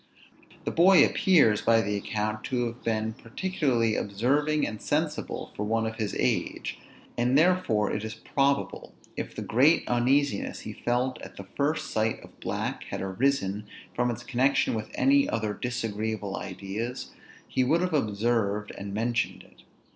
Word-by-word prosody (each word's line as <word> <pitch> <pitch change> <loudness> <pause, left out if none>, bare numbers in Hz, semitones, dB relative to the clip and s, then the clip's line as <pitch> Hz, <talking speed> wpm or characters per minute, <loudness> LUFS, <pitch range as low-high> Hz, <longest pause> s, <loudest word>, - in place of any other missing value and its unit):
The - - -1
boy 175 -2 +7
appears 145 - +4
by 115 -1 +4
the 105 -1 -1
account 105 +1 -2
to 125 -2 0
have 120 +1 -6
been 110 -1 -1
particularly 120 - 0
observing 140 +9 +1
and 110 - -5
sensible - - -2
for - - -5
one 115 +2 0
of 110 0 -4
his 105 -3 -2
age; - - -1 0.4
and 125 +3 +3
therefore 155 - +3
it 105 - -2
is 110 0 -5
probable, 140 +2 -1 0.2
if - - -5
the - - -4
great 140 +9 +3
uneasiness 130 0 +1
he - - -7
felt 125 +2 -1
at - - -11
the 100 - -8
first 150 +3 0
sight 110 +1 0
of - - -16
black - - -3
had - - -5
arisen 105 0 0 0.3
from 120 0 +1
its 120 0 -4
connection 135 +3 +2
with 110 -1 -3
any 275 +1 +4
other 110 -2 -1
disagreeable 110 -3 -3
ideas, 100 +7 -5 0.4
he 130 - +1
would 160 +7 +2
have 180 -2 -1
observed 105 -4 0
and 100 0 -6
mentioned 115 +2 -1
it. - - -21
115 Hz, 155 wpm, -27 LUFS, 105-140 Hz, 0.4 s, boy